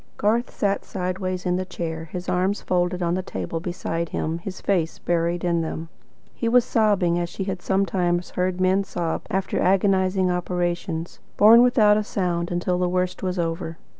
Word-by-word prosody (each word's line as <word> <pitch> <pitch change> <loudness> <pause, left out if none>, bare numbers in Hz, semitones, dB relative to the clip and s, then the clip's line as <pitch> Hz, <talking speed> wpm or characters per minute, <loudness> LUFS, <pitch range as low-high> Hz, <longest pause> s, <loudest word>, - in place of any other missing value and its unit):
Garth 225 +4 +1
sat 200 -1 -1
sideways 185 0 -3
in 180 0 +1
the 185 - -1
chair, 165 -3 -5
his 180 +3 -7
arms 185 +3 +1
folded 180 0 0
on 170 0 +1
the 185 - 0
table 165 -2 -4
beside 170 -1 -3
him, 160 +2 -2
his 185 +2 -7
face 175 -5 0
buried 170 0 -1
in 170 -1 +1
them. 160 0 -5 0.4
He 230 - -1
was 245 0 +5
sobbing 200 -6 +2
as 175 -1 -2
she 195 - -4
had 190 -2 -4
sometimes 180 -2 0
heard 180 0 -1
men 185 +1 +3
sob 170 -4 -3
after 190 -2 -1
agonising 190 -1 +2
operations, 175 -1 -2 0.2
borne 225 +3 +8
without 220 -4 +5
a 215 - 0
sound 175 -4 -1
until 180 +1 -1
the 180 -1 +1
worst 180 0 -1
was 185 -1 -2
over. 165 -1 -3
180 Hz, 175 wpm, -24 LUFS, 175-195 Hz, 0.4 s, borne